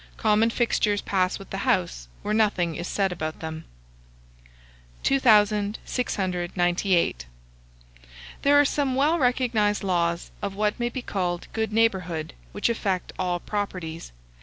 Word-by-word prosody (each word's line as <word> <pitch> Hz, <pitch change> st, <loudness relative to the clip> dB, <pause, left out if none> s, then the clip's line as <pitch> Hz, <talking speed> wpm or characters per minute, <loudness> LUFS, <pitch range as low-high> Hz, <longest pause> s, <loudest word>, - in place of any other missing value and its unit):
Common 215 Hz, +1 st, +3 dB
fixtures 225 Hz, -3 st, +1 dB
pass 185 Hz, -2 st, 0 dB
with 195 Hz, -, -13 dB
the 195 Hz, -, -3 dB
house, 170 Hz, -, 0 dB, 0.2 s
where 210 Hz, -, -1 dB
nothing 195 Hz, -7 st, +1 dB
is 175 Hz, -, -4 dB
said 195 Hz, -2 st, 0 dB
about 155 Hz, -3 st, -4 dB
them. 160 Hz, 0 st, -6 dB, 1.4 s
2698. 200 Hz, -, +1 dB, 1.2 s
There 285 Hz, +1 st, +5 dB
are 290 Hz, -, +5 dB
some 280 Hz, -2 st, 0 dB
well 300 Hz, +5 st, +2 dB
recognized 240 Hz, -6 st, +1 dB
laws, 170 Hz, -2 st, 0 dB
of 200 Hz, -1 st, -3 dB
what 210 Hz, +2 st, 0 dB
may 240 Hz, 0 st, 0 dB
be 245 Hz, +1 st, -5 dB
called 180 Hz, -5 st, -2 dB
good 220 Hz, -1 st, -1 dB
neighbourhood, 185 Hz, -8 st, 0 dB, 0.2 s
which -, -, 0 dB
affect 200 Hz, -6 st, -1 dB
all 180 Hz, -1 st, 0 dB
properties. 180 Hz, -, -4 dB
200 Hz, 125 wpm, -25 LUFS, 175-225 Hz, 1.4 s, There